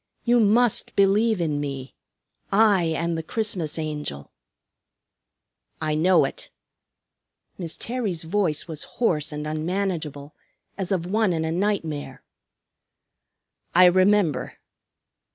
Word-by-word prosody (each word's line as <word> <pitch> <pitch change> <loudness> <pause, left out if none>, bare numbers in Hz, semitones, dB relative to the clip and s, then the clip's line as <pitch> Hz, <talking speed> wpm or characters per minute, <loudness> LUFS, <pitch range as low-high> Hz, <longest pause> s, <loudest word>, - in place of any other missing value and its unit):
You 240 0 +3
must 230 +2 +3
believe 205 +2 +3
in 155 -4 -1
me. 135 -2 -5 0.6
I 200 -4 +4
am 165 +1 -1
the 165 - -2
Christmas 180 -4 -2
Angel." 150 - -5 1.5
"I 155 -1 -1
know 175 +5 +4
it." - - -7 1.1
Miss 170 -3 -6
Terry's 220 -9 -3
voice 165 -3 0
was 160 -3 -5
hoarse 155 -12 +1
and 150 0 -5
unmanageable, 155 -2 -3 0.4
as 190 -1 -4
of 180 -3 0
one 210 0 +1
in 160 -1 -1
a 160 - -2
nightmare. 165 -7 -2 1.5
"I 180 +1 +8
remember." 185 -5 +3
170 Hz, 110 wpm, -24 LUFS, 155-200 Hz, 1.5 s, I